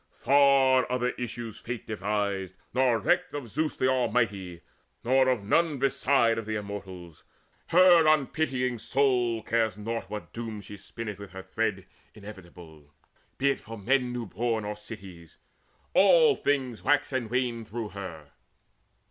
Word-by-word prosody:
Far 135 -2 +4
other 125 0 0
issues 120 -3 -6
Fate 120 -1 -6
devised, 100 -2 -2 0.2
nor 125 -2 +3
recked 180 - 0
Of 135 -5 -6
Zeus 155 +7 -2
the 130 - +1
Almighty, 105 -9 0 0.4
nor 130 +2 +3
of 125 -5 0
none 155 +8 +2
beside 135 -3 +2
Of 110 - -7
the 110 - -2
Immortals. 95 -5 -8 0.4
Her 175 -2 +6
unpitying 135 -5 +1
soul 125 -4 +1
Cares 110 -4 0
naught 115 -1 -4
what 105 0 -7
doom 115 -2 -5
she 105 0 -10
spinneth 105 0 -7
with 100 -2 -10
her 95 0 -8
thread - - -2 0.3
Inevitable, 85 -7 -13 0.5
be 140 +1 +3
it - - -4
for 115 +1 -9
men 125 +4 +1
new 120 -1 -4
born 110 +2 -2
Or 105 0 -4
cities: 100 -6 -11 0.6
all 480 -4 +6
things 130 -5 -1
wax 145 -1 +1
and 125 -4 -2
wane 120 -1 -1
through 110 0 -6
her. 85 -7 -9
115 Hz, 145 wpm, -27 LUFS, 100-130 Hz, 0.6 s, Her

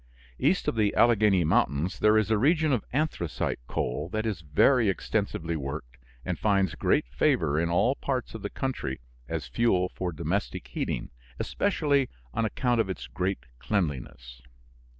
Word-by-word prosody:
East - - +2
of - - +2
the 105 -2 +1
Alleghany 105 -6 +4
Mountains 85 -3 +1
there 105 0 +5
is 110 0 +1
a 110 - +4
region 155 +3 +3
of 120 - 0
anthracite 130 - -1
coal 75 +7 -2
that 110 +3 -2
is 105 -7 -2
very 100 - +3
extensively 95 -4 -1
worked 70 -4 -6 0.3
and - - -2
finds 100 -4 +2
great - - +1
favor 70 +4 +1
in 85 0 0
all 90 +9 +3
parts 130 -4 -3
of 110 - -7
the 100 - -4
country 125 - -3 0.3
as - - -3
fuel 90 - +1
for 90 -1 -4
domestic 70 -5 -3
heating, - - -3 0.3
especially 145 -9 +1 0.2
on 115 - 0
account 120 +1 +1
of 100 - -3
its 95 - -4
great 90 -7 -3
cleanliness. 65 - -3
100 Hz, 155 wpm, -27 LUFS, 75-115 Hz, 0.3 s, there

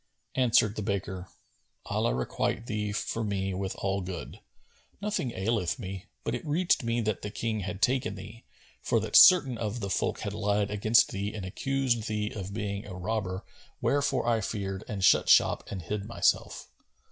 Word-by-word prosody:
Answered 120 -4 +3
the - - -1
baker, 95 -3 -3 0.6
"Allah - - 0
requite 65 - -1
thee 105 -3 -2
for 115 +2 -2
me 95 -2 -1
with 95 +1 -3
all 95 0 -1
good! 90 - -7 0.6
Nothing 200 - -2
aileth 95 -4 -1
me; 95 -3 -7 0.2
but - - -2
it - - -3
reached 165 +3 +2
me 115 0 0
that 110 -3 -1
the 105 - -4
King 110 +1 -2
had 100 +1 -4
taken 130 0 +1
thee, 105 +5 -10 0.4
for - - +1
that - - -3
certain 135 -10 +8
of 110 +1 -3
the 100 -3 -4
folk - - -1
had - - -3
lied 105 0 0
against 110 +3 +4
thee 100 +1 -3
and 100 -3 -5
accused 125 +2 -1
thee 105 -1 -2
of 100 -3 -6
being 100 -1 -3
a 95 - -7
robber 95 0 -3 0.3
wherefore 140 -3 +1
I 115 -2 +2
feared 95 -1 -3
and 100 -3 -4
shut - - +5
shop - - +5
and 95 -3 -5
hid 100 +3 -3
myself." 120 - 0
105 Hz, 175 wpm, -29 LUFS, 95-115 Hz, 0.6 s, certain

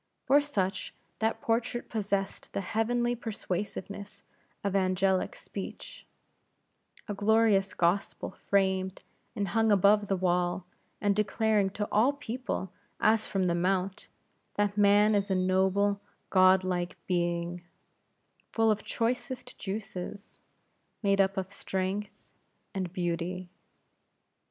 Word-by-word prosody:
For 280 +2 +6
such, 195 -10 -2 0.2
that 220 0 0
portrait 230 +1 -1
possessed 200 -3 -2
the - - -1
heavenly 240 +4 0
persuasiveness 205 -3 -5 0.4
of 200 -1 -1
angelic 185 0 +2
speech; - - -8 1.0
a 205 - -2
glorious 205 -1 +3
gospel 175 +3 0
framed 190 -1 0 0.3
and 200 -2 -1
hung 225 +3 +3
upon 205 +1 +5
the 195 - +1
wall, 180 0 0 0.3
and 205 -1 +2
declaring 210 -1 +2
to 205 0 -1
all 235 +7 +4
people, 250 -8 -4 0.3
as 220 0 +3
from 190 -2 0
the 175 - +2
Mount, 185 +2 0 0.5
that 205 -1 +1
man 205 +1 +5
is 200 0 +1
a 190 - +2
noble, 190 +2 +2 0.3
god 185 0 +6
like 180 -1 -2
being, 175 -1 -1 0.9
full 225 -1 +3
of 210 0 -1
choicest 250 +2 -2
juices; 200 0 -6 0.6
made 200 -1 +4
up 195 +1 +1
of 190 +1 -3
strength 195 +2 -3 0.5
and 185 -3 -3
beauty. 175 0 -3
200 Hz, 115 wpm, -29 LUFS, 185-215 Hz, 1.0 s, For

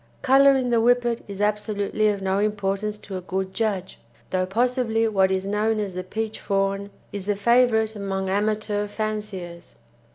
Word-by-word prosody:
Colour 275 +1 +6
in 255 -2 0
the 235 - +4
Whippet 240 0 +2
is 200 -1 -6
absolutely 210 0 0
of 200 -2 0
no 190 +1 +1
importance 210 0 -1
to 195 -2 -7
a - - -5
good 190 +1 -3
judge, 205 -5 -2 0.3
though 185 0 0
possibly 225 +1 +1
what 195 -3 +3
is 190 0 -1
known 215 +2 0
as 200 -3 -3
the 185 0 -4
peach 220 +3 -4
fawn 195 0 -1 0.2
is 200 -1 -6
the 205 - +1
favourite 220 0 +3
among 195 -1 -3
amateur 210 +1 0
fanciers. 205 -5 -5
210 Hz, 165 wpm, -24 LUFS, 195-220 Hz, 0.3 s, Colour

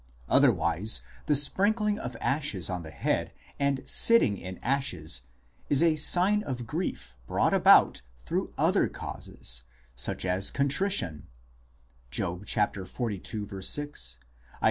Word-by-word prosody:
Otherwise 85 +7 +2 0.3
the 150 - +3
sprinkling 205 - +2
of 125 -2 -6
ashes 135 - 0
on 90 -1 -3
the 80 - -9
head 75 - -2 0.3
and 140 -1 0
sitting 230 - +5
in 95 -1 -8
ashes 90 - 0 0.5
is 145 +3 +4
a 165 -2 +3
sign 185 +7 +3
of 125 - -5
grief 155 - -5
brought - - +1
about - - +5 0.2
through - - -2
other - - +2
causes, - - -4 0.3
such 65 - -1
as 95 +1 +2
contrition 140 - 0 0.8
(Job 90 +9 -3
xlii. 105 0 -1
125 Hz, 110 wpm, -28 LUFS, -, 0.8 s, sitting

